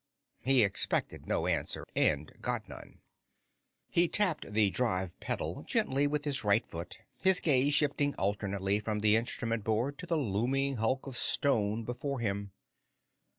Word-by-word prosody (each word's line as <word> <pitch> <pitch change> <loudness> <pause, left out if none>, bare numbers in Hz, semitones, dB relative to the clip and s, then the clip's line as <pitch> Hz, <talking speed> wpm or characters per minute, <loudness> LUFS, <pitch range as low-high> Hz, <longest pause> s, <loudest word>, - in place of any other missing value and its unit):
He 130 -2 +5
expected 100 -1 +1
no - - 0
answer, - - -2
and 75 0 +1
got - - -3
none. - - -13 0.9
He 170 +1 +4
tapped 175 - +1
the 105 -2 +3
drive 95 -8 -2
pedal - - -3
gently 140 +2 +1
with 150 +1 -2
his 140 -5 -1
right 105 +2 +3
foot, 85 +1 -7 0.2
his 190 -1 +4
gaze 145 -1 +2
shifting 145 -1 +1
alternately 100 0 -1
from 105 0 -3
the 105 0 +5
instrument 115 -1 -1
board 115 +7 -1
to 180 - -6
the 165 -1 0
looming 135 +3 -1
hulk 120 +4 -1
of 135 -3 -6
stone 110 -6 +1
before 130 +4 -4
him. 100 -3 -3
115 Hz, 150 wpm, -31 LUFS, 105-140 Hz, 0.9 s, He